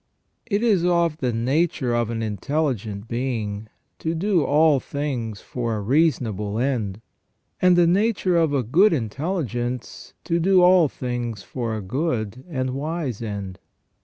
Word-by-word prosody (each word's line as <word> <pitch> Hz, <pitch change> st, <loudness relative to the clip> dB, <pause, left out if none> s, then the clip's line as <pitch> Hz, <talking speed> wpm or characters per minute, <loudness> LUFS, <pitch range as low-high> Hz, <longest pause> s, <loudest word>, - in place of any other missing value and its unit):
It 210 Hz, 0 st, 0 dB
is 205 Hz, -7 st, +3 dB
of 170 Hz, -3 st, +2 dB
the 130 Hz, -6 st, -1 dB
nature 130 Hz, +2 st, 0 dB
of 120 Hz, -1 st, 0 dB
an 115 Hz, -1 st, -2 dB
intelligent 110 Hz, -, -2 dB
being 110 Hz, -4 st, -3 dB, 0.3 s
to 165 Hz, +1 st, -2 dB
do 180 Hz, -1 st, +2 dB
all 150 Hz, -1 st, +4 dB
things 125 Hz, -8 st, -4 dB
for 120 Hz, -3 st, -3 dB
a -, -, -2 dB
reasonable 110 Hz, -, +1 dB
end; 115 Hz, -6 st, -1 dB, 0.6 s
and 180 Hz, -1 st, +5 dB
the 175 Hz, -1 st, +5 dB
nature 190 Hz, 0 st, +2 dB
of 165 Hz, -3 st, +3 dB
a 140 Hz, -3 st, +1 dB
good 170 Hz, -, +4 dB
intelligence 125 Hz, -, -3 dB
to 170 Hz, +1 st, 0 dB
do 185 Hz, +1 st, +4 dB
all 180 Hz, -2 st, +6 dB
things 120 Hz, -6 st, -4 dB
for 115 Hz, -1 st, -3 dB
a 105 Hz, -, -6 dB
good 125 Hz, -, -2 dB
and 130 Hz, -5 st, -2 dB
wise 145 Hz, -3 st, -3 dB
end. 100 Hz, -4 st, -5 dB
130 Hz, 145 wpm, -23 LUFS, 115-165 Hz, 0.6 s, all